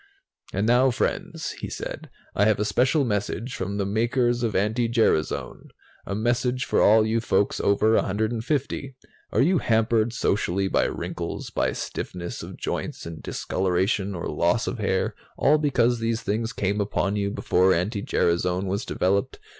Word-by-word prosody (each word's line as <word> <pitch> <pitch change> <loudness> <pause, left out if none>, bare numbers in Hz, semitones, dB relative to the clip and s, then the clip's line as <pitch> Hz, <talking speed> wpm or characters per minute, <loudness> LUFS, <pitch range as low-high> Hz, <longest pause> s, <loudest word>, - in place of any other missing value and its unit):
"And 100 +2 -1
now, 125 +3 +4
friends," 120 - -2
he - - -4
said, - - -6 0.2
"I 105 - +3
have 110 -2 +3
a 105 - +1
special 130 +7 +2
message 110 +3 -2
from 100 0 -3
the 100 - 0
makers 120 +4 +1
of 115 -3 -1
anti 110 +4 +1
gerasone, 110 -9 0 0.4
a 100 - -2
message 125 +3 0
for - - +2
all 110 +1 +6
you 110 +1 +1
folks 100 -2 +1
over 105 +2 +3
150. 115 +6 -1 0.4
Are - - +2
you 175 +3 +3
hampered 115 -1 +2
socially 100 -4 0
by - - +2
wrinkles, - - -4
by - - 0
stiffness 85 -1 -5
of - - -9
joints - - -4
and 85 -1 -7
discoloration 95 +2 -1
or 85 - -4
loss 85 +7 +1
of - - -4
hair, 95 -2 0 0.2
all 150 +2 +4
because 125 -5 +2
these 115 0 -1
things 115 +3 -1
came 100 +2 -1
upon 100 0 -1
you 100 -1 0
before 95 -2 +2
anti 100 +5 0
gerasone 90 +1 +1
was 100 +6 -2
developed? 100 -2 0
110 Hz, 160 wpm, -25 LUFS, 95-120 Hz, 0.4 s, all